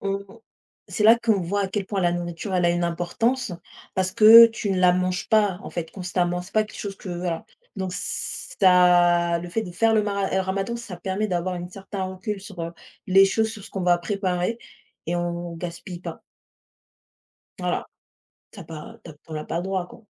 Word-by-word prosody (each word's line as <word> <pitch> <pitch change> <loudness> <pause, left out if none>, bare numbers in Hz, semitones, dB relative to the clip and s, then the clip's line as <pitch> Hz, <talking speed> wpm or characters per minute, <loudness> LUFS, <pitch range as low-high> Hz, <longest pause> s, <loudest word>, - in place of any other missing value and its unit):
on 195 0 -2 0.6
c'est 215 - -2
là 225 +2 +8
qu'on 225 -5 +1
voit 200 +4 -1
à 195 - -2
quel 195 0 -3
point 195 -1 -2
la 175 -1 +2
nourriture 175 +3 -4
elle 180 -1 +2
a - - +4
une 175 0 0
importance, 200 +8 -1 0.4
parce 185 0 0
que 225 +3 +10
tu 225 -2 -4
ne 190 - 0
la 180 -1 +5
manges 185 +1 -1
pas, 205 -4 +3
en - - -8
fait, 165 -2 -5
constamment. 180 -1 -1
C'est 180 - -14
pas 215 - +3
quelque 215 - -12
chose 200 -1 -5
que, 195 - -10
voilà. 175 +3 -3 0.3
Donc 190 -1 -3
ça 175 -3 +3
le 175 - -7
fait 220 +6 -1
de 180 - -7
faire 225 +5 +2
le 215 - +3
mara 200 -1 -1
heu, 190 - +2
ramadan, 195 +4 -2
ça 230 -6 -8
permet 190 +4 -2
d'avoir 180 -1 -1
une 175 0 -7
certain 195 0 -6
recul 190 +3 -4
sur, 195 -2 -10
heu, 165 0 -4 0.3
les 195 +1 +6
choses, 220 +3 +1
sur 215 -3 -9
ce - - -12
qu'on 195 - -4
va 175 -1 +4
préparer 185 +2 -1 0.5
et 175 +2 -1
on 175 0 -3
gaspille 175 +1 -7
pas - - -7 1.4
voilà. - - -1 0.7
Tu 205 - -11
as - - -9
pas 155 -1 -10
tu 170 - -9
as - - -13
p - - -30
on 160 - -6
n'a 155 0 -4
pas 160 - -4
le - - -2
droit, 190 -1 -2
quoi. 225 - -15
185 Hz, 215 wpm, -24 LUFS, 175-205 Hz, 1.4 s, que